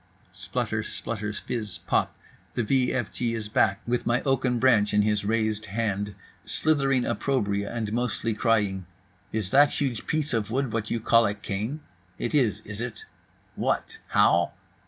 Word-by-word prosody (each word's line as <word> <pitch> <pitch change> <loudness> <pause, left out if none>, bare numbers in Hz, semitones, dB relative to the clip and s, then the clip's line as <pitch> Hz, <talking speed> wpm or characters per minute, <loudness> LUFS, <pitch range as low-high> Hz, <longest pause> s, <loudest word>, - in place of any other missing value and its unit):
Splutter - - -2
splutter 105 -2 -4
fizz 105 -1 -3
Poop—the 120 - -2
v 125 +2 +2
f 120 -5 -2
g 115 -2 -1
is 105 -2 -5
back, 100 -2 +2
with 120 0 -1
my 120 +1 +2
oak 135 -2 +2
branch 110 -5 +4
in 105 - +5
his 105 -1 +1
raised 110 0 0
hand, 105 -1 -2 0.3
slithering 135 -5 +2
opprobria 100 -9 0
and 110 -3 -3
mostly 115 -2 0
crying: 105 -5 +1 0.4
"Is 105 -3 -2
that 145 +2 +5
huge 130 -6 -2
piece 150 -2 0
of 110 -3 0
wood 130 0 -1
what 110 -1 -1
you 115 - 0
call 115 0 +4
a 100 - -2
cane? 105 +8 -4 0.4
It - - -3
is, 115 -8 +2
is 105 0 -7
it? 120 -3 -5 0.5
What? - - -1
How? 85 0 +3
115 Hz, 155 wpm, -26 LUFS, 105-125 Hz, 0.5 s, in